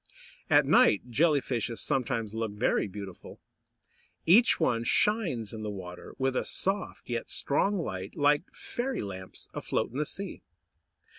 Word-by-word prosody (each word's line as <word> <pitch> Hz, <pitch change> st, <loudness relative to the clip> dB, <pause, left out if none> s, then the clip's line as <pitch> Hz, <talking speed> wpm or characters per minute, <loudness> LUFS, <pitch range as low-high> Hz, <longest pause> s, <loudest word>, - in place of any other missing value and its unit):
At -, -, +6 dB
night 120 Hz, +4 st, +4 dB
Jelly 150 Hz, +2 st, +3 dB
fishes 120 Hz, -3 st, -2 dB
sometimes 115 Hz, -6 st, -1 dB
look 115 Hz, -2 st, -2 dB
very 105 Hz, 0 st, +1 dB
beautiful. 100 Hz, -2 st, -9 dB, 0.9 s
Each 215 Hz, +9 st, +6 dB
one 120 Hz, -8 st, +1 dB
shines 160 Hz, -, +1 dB
in 110 Hz, -, -6 dB
the 105 Hz, -, -3 dB
water, 90 Hz, -3 st, -8 dB
with 135 Hz, 0 st, 0 dB
a -, -, +1 dB
soft 195 Hz, 0 st, -2 dB
yet 120 Hz, -1 st, -3 dB
strong 195 Hz, +8 st, +1 dB
light, 95 Hz, -, -5 dB
like 145 Hz, +4 st, +2 dB
fairy 255 Hz, 0 st, -4 dB
lamps 95 Hz, -2 st, -7 dB
afloat -, -, -2 dB
in 125 Hz, -, -6 dB
the 150 Hz, -, +1 dB
sea. 200 Hz, 0 st, -4 dB
120 Hz, 145 wpm, -29 LUFS, 105-165 Hz, 0.9 s, At